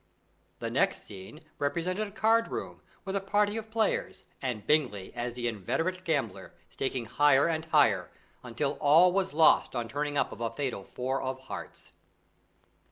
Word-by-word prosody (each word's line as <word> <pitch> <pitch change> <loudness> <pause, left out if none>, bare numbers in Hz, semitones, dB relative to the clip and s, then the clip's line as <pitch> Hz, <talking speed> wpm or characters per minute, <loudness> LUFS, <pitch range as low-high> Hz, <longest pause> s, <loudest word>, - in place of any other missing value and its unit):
The - - -4
next - - +1
scene 100 - -11 0.2
represented 180 +8 -1
a - - -12
card 225 +2 +3
room, - - -6 0.2
with 195 0 -3
a 200 - 0
party 205 +2 +1
of 220 -1 -5
players, 220 -1 -1 0.2
and 120 -6 -3
Bingley 125 -11 +1
as 120 0 -4
the 120 -1 -2
inveterate 165 - -2
gambler 130 - -2 0.2
staking 130 -3 -2
higher 145 +3 +4
and 160 -1 -1
higher, 115 - +3 0.3
until 125 +4 -3
all 165 +5 +6
was 190 0 0
lost 155 -3 +4
on 120 -1 -2
turning 145 +3 -2
up - - +1
of - - -9
a 115 - 0
fatal 130 -8 -3
four 130 +5 -3
of 130 0 -3
hearts. 100 -9 -9
145 Hz, 165 wpm, -29 LUFS, 120-185 Hz, 0.3 s, all